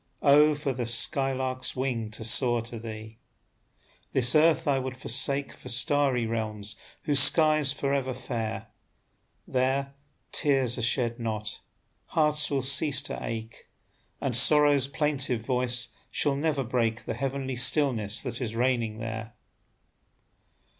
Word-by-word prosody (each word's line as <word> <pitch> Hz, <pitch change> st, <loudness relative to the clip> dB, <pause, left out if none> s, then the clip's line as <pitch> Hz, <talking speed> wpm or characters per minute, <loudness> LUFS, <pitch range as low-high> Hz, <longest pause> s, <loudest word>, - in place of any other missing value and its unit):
Oh, 150 Hz, +1 st, +5 dB
for 145 Hz, -2 st, -3 dB
the 120 Hz, -2 st, -4 dB
sky 135 Hz, +4 st, +2 dB
lark's 130 Hz, -1 st, -2 dB
wing 125 Hz, -4 st, -2 dB
to 110 Hz, +1 st, -8 dB
soar 120 Hz, 0 st, +3 dB
to 115 Hz, 0 st, -6 dB
thee! 110 Hz, 0 st, -9 dB, 0.9 s
This 125 Hz, -1 st, +4 dB
earth 155 Hz, 0 st, +3 dB
I 140 Hz, -2 st, +2 dB
would 130 Hz, 0 st, -5 dB
forsake 135 Hz, +3 st, -1 dB
For 130 Hz, -, -12 dB
starry 130 Hz, -1 st, +1 dB
realms 110 Hz, -2 st, -4 dB, 0.3 s
whose 145 Hz, -2 st, +2 dB
sky's 155 Hz, -1 st, +4 dB
forever 135 Hz, -2 st, -2 dB
fair; 115 Hz, -3 st, -5 dB, 0.8 s
There, 135 Hz, +2 st, -1 dB, 0.4 s
tears 135 Hz, -4 st, +1 dB
are -, -, -3 dB
shed 120 Hz, 0 st, 0 dB
not, 110 Hz, -2 st, -4 dB, 0.5 s
hearts 150 Hz, -1 st, +2 dB
will 135 Hz, -2 st, -1 dB
cease 140 Hz, +1 st, +2 dB
to -, -, -5 dB
ache, 115 Hz, 0 st, -7 dB, 0.5 s
And 130 Hz, -4 st, -2 dB
sorrow's 145 Hz, +1 st, +4 dB
plaintive 135 Hz, -5 st, -1 dB
voice 125 Hz, -1 st, 0 dB, 0.2 s
shall 140 Hz, -1 st, +1 dB
never 145 Hz, -1 st, -1 dB
break 115 Hz, -2 st, -1 dB
The -, -, -3 dB
heavenly 135 Hz, -1 st, -3 dB
stillness 125 Hz, -5 st, +1 dB
that 125 Hz, -2 st, -5 dB
is 115 Hz, -2 st, -3 dB
reigning 120 Hz, -3 st, 0 dB
there. 110 Hz, 0 st, -6 dB
130 Hz, 135 wpm, -27 LUFS, 115-140 Hz, 0.9 s, Oh